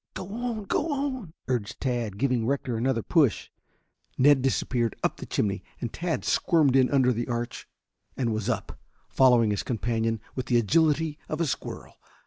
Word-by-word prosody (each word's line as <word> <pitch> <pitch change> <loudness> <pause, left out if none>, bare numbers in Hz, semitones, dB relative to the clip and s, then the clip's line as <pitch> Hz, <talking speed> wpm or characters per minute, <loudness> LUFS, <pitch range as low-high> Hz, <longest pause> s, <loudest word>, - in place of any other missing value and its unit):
"Go 185 - -5
on, 235 -2 -3
go 295 - -1
on!" 260 - -3
urged 120 -3 -2
Tad, 120 -6 -2
giving 125 -1 +1
Rector 135 -3 -1
another 115 0 0
push. 145 - +2 0.7
Ned 140 0 +5
disappeared 125 -3 0
up - - 0
the - - -8
chimney, 100 -1 -1 0.2
and 120 - -4
Tad 170 -1 -2
squirmed 150 -6 +3
in 130 -1 +5
under 130 -3 +3
the 120 +1 -3
arch 120 -1 -4 0.5
and 120 -4 0
was 110 +1 -2
up, 110 -4 -3 0.3
following 120 -5 +4
his 105 - -1
companion 115 -1 -1
with 130 - -4
the 120 - +3
agility 155 +5 +2
of 155 - -3
a 170 - +2
squirrel. 140 - -5
130 Hz, 165 wpm, -27 LUFS, 115-155 Hz, 0.7 s, Ned